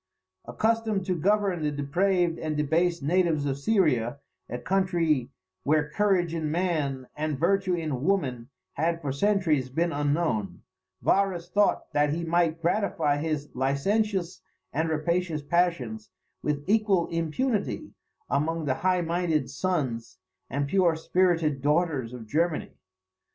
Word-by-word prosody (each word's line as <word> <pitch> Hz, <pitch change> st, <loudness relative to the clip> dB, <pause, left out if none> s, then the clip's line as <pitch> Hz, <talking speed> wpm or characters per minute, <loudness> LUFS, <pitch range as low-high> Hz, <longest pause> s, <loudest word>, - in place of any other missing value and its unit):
Accustomed 220 Hz, -, 0 dB
to 185 Hz, -, 0 dB
govern 195 Hz, 0 st, +1 dB
the 150 Hz, -, +1 dB
depraved 170 Hz, +4 st, +1 dB
and 155 Hz, -1 st, -2 dB
debased 165 Hz, +2 st, +1 dB
natives 165 Hz, -2 st, +2 dB
of 140 Hz, -1 st, -2 dB
Syria, 140 Hz, -, +2 dB, 0.3 s
a 120 Hz, -, -3 dB
country 165 Hz, -6 st, +1 dB, 0.3 s
where 150 Hz, 0 st, +1 dB
courage 185 Hz, -3 st, +2 dB
in 160 Hz, -2 st, -2 dB
man, 150 Hz, -6 st, -1 dB
and 150 Hz, -1 st, -2 dB
virtue 190 Hz, +3 st, +2 dB
in 155 Hz, -6 st, -3 dB
woman, 135 Hz, -10 st, 0 dB, 0.2 s
had 165 Hz, +3 st, 0 dB
for 145 Hz, -4 st, -3 dB
centuries 155 Hz, -5 st, +1 dB
been 165 Hz, +6 st, 0 dB
unknown, 145 Hz, -, -1 dB, 0.4 s
Varus 190 Hz, -3 st, +1 dB
thought 205 Hz, +2 st, +1 dB
that 145 Hz, 0 st, +3 dB
he 170 Hz, +2 st, -2 dB
might 165 Hz, -1 st, +1 dB
gratify 170 Hz, -5 st, +1 dB
his 150 Hz, -1 st, -2 dB
licentious 180 Hz, -, 0 dB, 0.3 s
and 160 Hz, +3 st, 0 dB
rapacious 160 Hz, 0 st, -1 dB
passions 145 Hz, -10 st, 0 dB, 0.3 s
with 145 Hz, -1 st, -1 dB
equal 205 Hz, -4 st, +3 dB
impunity 180 Hz, +8 st, -1 dB, 0.3 s
among 160 Hz, +3 st, 0 dB
the 135 Hz, -, +1 dB
high 185 Hz, -1 st, +2 dB
minded 165 Hz, -6 st, 0 dB
sons 135 Hz, -, -2 dB, 0.3 s
and 140 Hz, +2 st, -1 dB
pure 175 Hz, 0 st, +3 dB
spirited 165 Hz, -4 st, +1 dB
daughters 150 Hz, -4 st, +1 dB
of 125 Hz, -3 st, -8 dB
Germany. 160 Hz, +7 st, 0 dB
165 Hz, 130 wpm, -27 LUFS, 145-180 Hz, 0.4 s, that